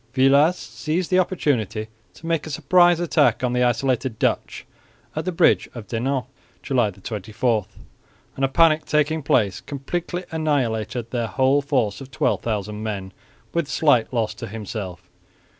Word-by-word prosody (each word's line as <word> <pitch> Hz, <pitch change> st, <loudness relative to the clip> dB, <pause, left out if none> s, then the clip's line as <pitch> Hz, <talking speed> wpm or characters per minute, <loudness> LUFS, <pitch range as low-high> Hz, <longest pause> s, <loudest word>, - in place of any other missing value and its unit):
Villars 140 Hz, +6 st, +5 dB
seized 165 Hz, +1 st, -3 dB
the 185 Hz, -, +5 dB
opportunity 120 Hz, -, 0 dB, 0.3 s
to -, -, -13 dB
make 165 Hz, -2 st, -1 dB
a -, -, -6 dB
surprise 175 Hz, +3 st, +4 dB
attack 155 Hz, -6 st, +2 dB
on 125 Hz, -1 st, +1 dB
the 125 Hz, -, +1 dB
isolated 125 Hz, 0 st, +1 dB
Dutch -, -, -1 dB, 0.5 s
at 155 Hz, +1 st, -3 dB
the 185 Hz, -, 0 dB
bridge 165 Hz, -, +3 dB
of 115 Hz, -3 st, -7 dB
Denain 130 Hz, +3 st, -1 dB, 0.4 s
(July 125 Hz, -6 st, +2 dB
24) 105 Hz, +3 st, -2 dB, 0.7 s
and, 135 Hz, -, -3 dB
a -, -, +5 dB
panic 155 Hz, +3 st, +4 dB
taking 150 Hz, +1 st, +1 dB
place, 100 Hz, -9 st, +1 dB
completely 175 Hz, +6 st, -4 dB
annihilated 125 Hz, -7 st, -1 dB
their 120 Hz, -2 st, -1 dB
whole 135 Hz, +4 st, +2 dB
force 125 Hz, -8 st, 0 dB
of 135 Hz, -, -9 dB
12,000 105 Hz, -5 st, -1 dB
men 100 Hz, -3 st, -4 dB, 0.4 s
with 170 Hz, -3 st, 0 dB
slight 140 Hz, -8 st, +2 dB
loss 115 Hz, -4 st, 0 dB
to -, -, -7 dB
himself. 105 Hz, -4 st, -6 dB
130 Hz, 145 wpm, -23 LUFS, 110-155 Hz, 0.7 s, Villars